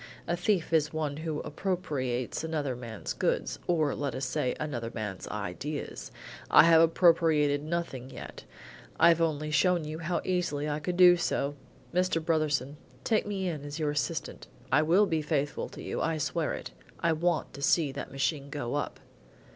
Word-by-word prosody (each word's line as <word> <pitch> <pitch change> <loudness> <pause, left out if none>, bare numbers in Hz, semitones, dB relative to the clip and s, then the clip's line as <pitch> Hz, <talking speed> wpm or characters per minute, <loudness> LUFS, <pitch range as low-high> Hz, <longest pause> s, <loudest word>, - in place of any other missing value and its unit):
"A 170 - +1
thief 175 -1 0
is 155 -2 +3
one 150 -2 -2
who 155 -1 -3
appropriates 145 -10 -2
another 150 -5 -2
man's 115 -8 -6
goods, 60 0 -1
or, 155 -5 +2
let 145 -2 -3
us 130 - -2
say, 130 -1 -1
another 120 -7 -3
man's 105 -4 -5
ideas. 105 +9 -5 0.4
I - - +8
have 165 0 +7
appropriated 160 -4 +4
nothing 155 -6 -3
yet. - - -9 0.6
I've 170 -1 +6
only 155 -2 0
shown 175 +1 +3
you 155 +1 -5
how 170 +2 -1
easily 175 -5 -1
I 150 0 -1
could 175 +4 -3
do 180 -1 +8
so. 145 -4 -1 0.4
Mr. 180 -1 +2
Brotherson, 150 -4 0 0.3
take 215 -2 +1
me 195 -2 -2
in 155 -5 -3
as 145 0 -6
your 155 -2 0
assistant. 145 - -3 0.2
I 150 - +5
will 175 +7 +4
be 160 -5 0
faithful 145 -1 -1
to - - -10
you, - - -3
I 165 -1 0
swear 150 - -1
it. - - -8 0.3
I 165 -1 +2
want 170 +1 0
to 140 - -9
see 145 0 +3
that - - -6
machine 140 +1 -1
go 140 -4 -4
up." 145 - -3
155 Hz, 170 wpm, -29 LUFS, 140-170 Hz, 0.6 s, I